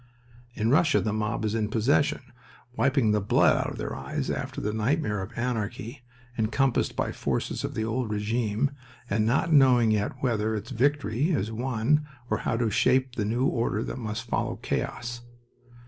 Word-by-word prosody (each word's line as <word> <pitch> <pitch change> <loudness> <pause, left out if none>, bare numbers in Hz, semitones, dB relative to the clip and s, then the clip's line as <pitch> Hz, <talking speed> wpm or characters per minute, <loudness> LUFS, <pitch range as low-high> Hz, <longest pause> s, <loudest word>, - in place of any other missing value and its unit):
In 110 +2 +1
Russia 150 +1 +4
the 105 - -1
mob 110 0 -1
is 105 - -1
in 110 -2 0
possession, 120 +6 +2 0.5
wiping 130 -2 +2
the 105 0 +2
blood 100 - +4
out - - -1
of - - -9
their - - -4
eyes - - -3
after - - -4
the 105 - -2
nightmare 110 -2 0
of 105 +5 -8
anarchy, 120 +1 -3 0.4
encompassed 120 +4 +1
by - - -1
forces - - -2
of - - -4
the 110 - -1
old 115 +1 -2
regime, 110 +4 0 0.4
and 105 +1 +2
not 140 +7 +2
knowing 125 -5 +6
yet 105 -1 0
whether 110 -3 +1
its 105 +1 -6
victory 140 +1 +1
is 115 - 0
won 130 +5 0 0.2
or - - +1
how 115 - -1
to 115 -2 0
shape 130 +4 +2
the 110 -4 -2
new 120 +5 0
order 115 -4 0
that - - -5
must 110 -2 -4
follow - - -1
chaos. 120 0 -3
115 Hz, 175 wpm, -27 LUFS, 110-130 Hz, 0.5 s, knowing